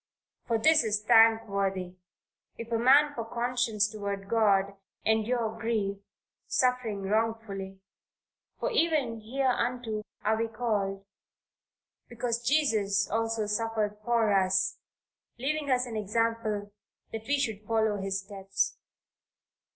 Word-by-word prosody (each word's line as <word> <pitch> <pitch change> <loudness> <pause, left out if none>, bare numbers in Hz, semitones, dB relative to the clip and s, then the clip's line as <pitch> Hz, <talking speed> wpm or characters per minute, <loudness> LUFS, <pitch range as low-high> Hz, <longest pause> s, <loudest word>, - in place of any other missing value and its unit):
"For 230 -2 +2
this 310 +5 +5
is 210 -1 0
thankworthy, 200 -5 +3 0.6
if 230 0 -8
a 230 - +1
man 285 +5 +5
for 235 - -4
conscience 235 -2 0
toward 200 -2 -5
God 200 -3 +2 0.3
endure 220 +1 +1
grief, 210 -3 -1 0.5
suffering 250 -6 0
wrongfully." 205 -2 -2 0.8
"For - - -1
even 300 - +1
hereunto 245 -2 -1 0.2
are 220 +1 +2
we 230 - 0
called, 205 -4 -2 1.0
because 235 0 -2
Christ 215 -8 +1
also 225 0 0
suffered 210 -1 -1
for 230 -2 +2
us, 190 0 +2 0.6
leaving 290 +3 -2
us 250 -1 +2
an 235 -3 -7
example 215 -1 -1 0.4
that 225 0 -6
we 285 +1 +2
should 220 -7 -2
follow 220 -2 +1
his 195 0 -2
steps." 195 0 -3
225 Hz, 110 wpm, -29 LUFS, 205-240 Hz, 1.0 s, this